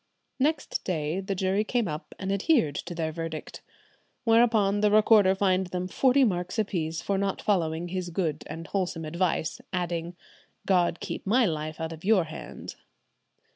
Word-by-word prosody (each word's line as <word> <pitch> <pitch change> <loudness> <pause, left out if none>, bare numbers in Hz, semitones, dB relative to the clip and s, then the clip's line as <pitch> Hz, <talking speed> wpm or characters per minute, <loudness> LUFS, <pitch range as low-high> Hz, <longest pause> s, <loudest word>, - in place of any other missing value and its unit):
Next 295 +2 0
day 160 -1 -1
the 195 0 -3
jury 190 +3 +1
came 235 -1 0
up, 155 0 -6
and 195 0 -3
adhered 200 - +2
to 170 +4 -5
their 160 -1 -2
verdict. 165 -1 -6 0.6
Whereupon 225 -4 +4
the 210 - +4
recorder 210 -2 +5
fined 190 -1 +2
them 180 0 -3
forty 265 +7 +3
marks 180 -3 -1
apiece 165 -7 -1
for 195 -1 0
not 195 -1 -1
following 170 -4 0
his 180 -1 -3
"good 165 -4 -2
and 165 +2 -7
wholesome 180 -4 -2
advice," 170 0 -1
adding, 175 -1 -2 0.5
"God 175 -3 +2
keep - - -5
my 240 +4 +4
life 155 -3 -3
out 160 0 -3
of 160 - -12
your 200 -2 +4
hands." 155 0 -9
185 Hz, 160 wpm, -27 LUFS, 165-205 Hz, 0.6 s, recorder